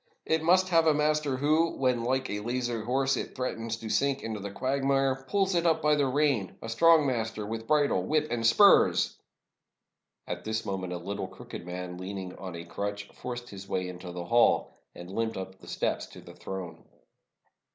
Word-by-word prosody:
It 160 0 +1
must 185 +3 +4
have 165 -2 +4
a 155 - +5
master, 150 -2 +1
who, 155 +4 +2
when, 125 -3 +1
like 130 +2 0
a 105 - -3
lazy 120 +1 -2
horse, 135 +4 +1
it - - -5
threatens 115 -3 -3
to 115 - -8
sink 140 +3 +1
into 110 -2 -4
the 100 +1 -5
quagmire, 135 +3 0
pulls 195 -1 +2
it 170 -1 +2
up 160 -1 +3
by 150 0 +4
the 145 -2 +2
rein; 130 -7 +1
a 115 - -7
strong 160 +6 +5
master 110 -5 -2
with 115 +1 -5
bridle, 150 -2 +3
whip, 155 0 +1
and 120 -1 -1
spurs!" 200 - +5 1.1
At 90 0 -5
this 110 0 -2
moment 95 -3 -3
a - - -3
little 100 +4 -4
crooked 85 - -10
man, 90 0 -6
leaning 95 -1 -6
on 90 -2 -7
a 85 0 -7
crutch, 100 +3 -4
forced 120 -1 -6
his 100 -1 -9
way 90 0 -1
into 90 0 -8
the 90 0 -6
hall, 120 +6 +3 0.2
and 90 +1 -9
limped 115 +1 -2
up 95 0 -5
to 95 - -24
the - - -14
steps - - -2
of - - -12
the - - -11
throne. 90 -4 -7
120 Hz, 195 wpm, -29 LUFS, 100-145 Hz, 1.1 s, a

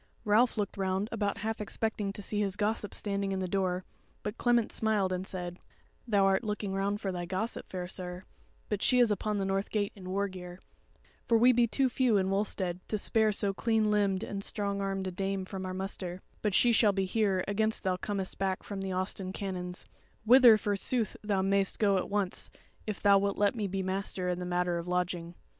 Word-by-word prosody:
Ralph 220 +4 +4
looked 205 -2 -2
round 190 +2 -1
about 205 -3 -1
half 220 0 -3
expecting 210 -1 -2
to 205 - -7
see 210 +1 -2
his 200 -2 0
gossip 210 0 -1
standing 200 -1 -1
in - - -1
the 190 -1 -2
door; 185 -1 -1 0.4
but 210 +1 -3
Clement 240 -2 +2
smiled 210 -4 +1
and 185 +1 -3
said: 180 -1 -5 0.5
"Thou 200 -3 +3
art 195 +3 +3
looking 210 -2 -3
round 200 +1 0
for 195 -3 -2
thy 175 -1 -4
gossip, 195 +6 -3
fair 180 -1 -4
sir; 180 0 -6 0.4
but 210 -2 -2
she 250 - +3
is 240 -3 +5
upon 210 +1 -1
the 195 - 0
north 195 +1 -1
gate 205 -2 0
in 185 -2 -9
war 200 +2 0
gear; 180 -1 -9 0.7
for 230 - +5
we 245 +3 +6
be 240 -1 +3
too 270 +4 +2
few 250 -3 +2
in 190 0 +1
Wulstead 190 -3 -1
to 215 - -1
spare 220 +1 +3
so 200 -1 +1
clean 220 0 +1
limbed 200 -2 +2
and 200 -1 -4
strong 200 -1 -2
armed 195 -1 -2
a 185 - -2
dame 195 +1 -2
from 190 -1 -5
our - - -3
muster; 185 -1 -5 0.2
but 210 -3 0
she 240 - +5
shall 220 -3 +4
be 195 0 0
here 195 -2 +1
against 220 +2 0
thou 185 -2 +1
comest 195 0 -4
back 190 -1 -1
from 200 -2 -5
the 190 0 -3
Austin 185 0 -1
Canons, 180 -2 -5 0.4
wither 240 -1 +8
forsooth 210 +2 0
thou 200 -2 +1
mayst 195 0 +2
go 200 -2 +3
at 185 - -2
once 200 -2 -1 0.4
if 215 - -3
thou 200 -1 +6
wilt 200 0 -1
let 205 +2 +3
me 215 -4 -2
be 190 0 -2
master 185 -1 -2
in 180 0 -1
the 180 - -4
matter 175 -1 0
of 170 - -7
lodging." 175 -1 -2
195 Hz, 210 wpm, -30 LUFS, 185-210 Hz, 0.7 s, wither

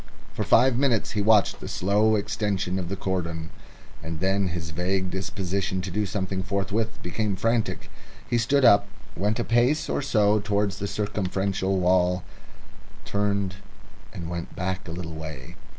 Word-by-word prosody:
For - - -2
five 130 -1 +4
minutes 130 -6 +2
he 105 - 0
watched 105 -1 +4
the - - -7
slow 105 +4 +2
extension 100 -3 -1
of 85 -2 -4
the 100 - -2
cordon, 85 -4 -3 0.5
and 80 -1 -5
then 95 +2 +1
his 85 -2 -4
vague 90 +3 -1
disposition 95 0 -2
to 90 0 -5
do 105 +3 0
something 95 -1 -2
forthwith 100 +4 -1
became 100 +3 -1
frantic. 115 +2 -1 0.4
He 120 - +1
stood 135 +4 +3
up, 100 -3 +6 0.3
went 105 +4 0
a - - +1
pace 120 +7 +2
or - - 0
so 105 -5 +3
towards 100 -1 0
the 100 - -2
circumferential 95 -1 -1
wall, 90 0 +2 0.8
turned, 100 -2 -1 0.5
and 90 -6 -6
went 85 0 -5
back 95 +1 -3
a - - -5
little 85 -1 -5
way. 80 -5 -8
100 Hz, 155 wpm, -25 LUFS, 90-105 Hz, 0.8 s, up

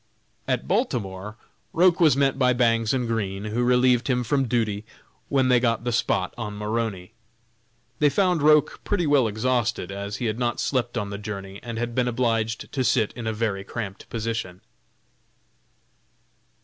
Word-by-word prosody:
At - - -1
Baltimore 100 -1 -2 0.4
Roch 180 +1 +4
was 155 -6 +5
met 135 -1 +2
by 125 -1 +4
Bangs 115 -2 +2
and 125 -3 0
Green, 100 -4 -2
who 110 +3 -1
relieved 125 0 +3
him 125 -2 +1
from 135 +1 +1
duty 110 -3 0 0.5
when 135 -2 +2
they 125 -1 +5
got 115 -1 0
the 120 - -1
"spot" 95 -5 0
on 105 -2 -5
Maroney. 105 -3 -3 0.9
They 150 - +5
found 180 0 +2
Roch 150 0 +3
pretty 190 -5 0
well 145 -5 +4
exhausted, 115 -2 -1
as 100 +1 -5
he 125 - -4
had 110 +1 -2
not 120 -1 -1
slept 125 -3 -1
on 100 -3 -3
the 100 - -5
journey, 100 -2 -7
and 115 -2 -6
had 120 0 -3
been 125 0 +1
obliged 115 -2 -1
to 130 - -1
sit 110 -2 +2
in 115 -2 -6
a - - +1
very 105 -3 -2
cramped 100 -1 -7
position. 110 -5 -4
115 Hz, 165 wpm, -24 LUFS, 105-125 Hz, 0.9 s, was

